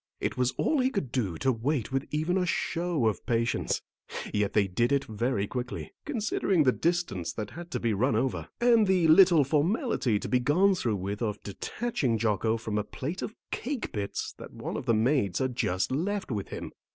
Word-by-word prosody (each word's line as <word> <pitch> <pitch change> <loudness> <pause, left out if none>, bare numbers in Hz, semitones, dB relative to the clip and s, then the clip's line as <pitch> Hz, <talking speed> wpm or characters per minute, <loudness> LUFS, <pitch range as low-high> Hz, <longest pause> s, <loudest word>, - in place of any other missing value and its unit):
It - - -2
was 125 -1 +2
all 310 - +1
he 255 0 +3
could 195 - -3
do 105 -11 -1
to 135 +7 +2
wait 130 +2 -1
with 135 +1 -1
even 155 +4 0
a 190 - +2
show 170 -5 0
of 110 -2 0
patience, 115 -1 0 0.5
yet 105 -1 +1
they 105 -2 +4
did 115 +7 +1
it 140 -1 +3
very 110 -1 -1
quickly, 125 +3 -5
considering 205 - +1
the 130 - +5
distance 165 - -1
that 105 +3 -5
had 175 +2 -9
to - - -2
be 115 -2 0
run 125 +8 +2
over, 130 - -1
and 235 -3 +5
the 185 -3 +3
little 170 -1 +7
formality 150 - +1
to - - -4
be 125 - +2
gone 175 +10 +4
through 120 - 0
with 100 +3 -4
of 105 -3 -2
detaching 130 - -2
Jocko 110 0 +1
from 110 -2 -2
a - - -1
plate 150 - -5
of 220 - -5 0.2
cake 265 -1 -3
bits 100 -2 -3
that - - -9
one - - -5
of - - -5
the 115 - +4
maids 110 -5 +2
had 130 -2 -1
just 90 -2 0
left 185 +5 -1
with 100 -4 -2
him. - - -6
130 Hz, 200 wpm, -28 LUFS, 110-175 Hz, 0.5 s, little